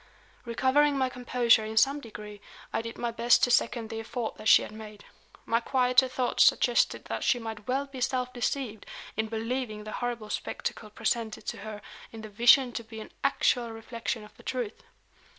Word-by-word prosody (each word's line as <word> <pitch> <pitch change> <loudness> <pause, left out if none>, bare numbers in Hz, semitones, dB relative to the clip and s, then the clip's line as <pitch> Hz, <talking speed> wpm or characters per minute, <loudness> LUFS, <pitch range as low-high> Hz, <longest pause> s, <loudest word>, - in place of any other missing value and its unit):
Recovering 270 +5 +2
my 260 -1 +1
composure 245 -2 +3
in 220 +1 -6
some 275 +5 +4
degree, 210 -3 -10 0.3
I - - 0
did 230 +1 -7
my 240 -1 -2
best 235 +1 +3
to 245 - +4
second 230 -1 +1
the 225 - -4
effort 230 0 -4
that 215 - -5
she - - +7
had - - -8
made. 215 -1 -11 0.4
My 230 - +2
quieter 250 +1 +3
thoughts 255 -1 +2
suggested 240 -1 +3
that - - -4
she 250 - +3
might 220 -3 -7
well 270 +2 0
be 270 -2 -9
self 250 0 -1
deceived 245 -3 -3 0.3
in 220 +1 -1
believing 225 0 -3
the 215 - -7
horrible 235 -3 -4
spectacle 215 - -4
presented 220 +1 -2
to - - -4
her 210 0 -8 0.3
in 225 - -9
the 215 - -8
vision 240 +4 +5
to 230 - -5
be 220 0 -10
an 215 - -10
actual 250 -3 +2
reflection 225 0 -5
of 210 - -15
the - - -15
truth. 245 -5 -4
235 Hz, 185 wpm, -28 LUFS, 220-250 Hz, 0.4 s, she